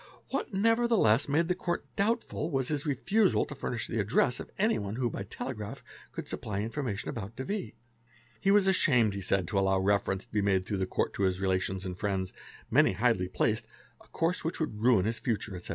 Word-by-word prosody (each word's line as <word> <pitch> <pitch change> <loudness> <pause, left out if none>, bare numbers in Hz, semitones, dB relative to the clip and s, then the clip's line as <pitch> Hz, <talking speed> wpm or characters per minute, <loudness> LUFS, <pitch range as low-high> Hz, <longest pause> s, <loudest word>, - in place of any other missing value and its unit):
What 275 - -2
nevertheless 215 - +3
made 160 +4 +2
the 180 - +2
Court 175 -1 -3
doubtful 205 -6 0
was 135 -4 -1
his 150 0 -2
refusal 190 - +2
to 145 - -8
furnish 120 -3 -3
the 115 - -3
address 105 +4 +2
of - - -7
anyone 150 - 0
who 120 -1 -1
by - - -5
telegraph 105 +1 -6 0.3
could - - -6
sup - - -5
ply 100 -1 -3
information 115 -2 -3
about 110 0 -6
de 130 - -4
V. 200 +6 -4 0.6
He 195 - +1
was 200 -1 +5
ashamed 125 - +4
he 100 - -4
said 95 -1 +1
to 100 - +1
allow 95 0 +2
reference 95 0 +1
to 120 - -33
be 105 - +2
made 95 -2 +2
through 100 - -2
the 95 -1 -1
Court - - -1
to - - -4
his 95 -1 +1
relations 95 0 0
and 90 -1 -4
friends, 95 -3 -1 0.4
many - - +5
highly 105 -3 +2
placed, 95 - 0 0.4
a - - -22
course 165 +2 -1
which 165 - -2
would 130 -10 -3
ruin 115 -6 +4
his 115 +1 -1
future, 110 -5 -2
etc. 90 - -7
115 Hz, 210 wpm, -30 LUFS, 100-160 Hz, 0.6 s, was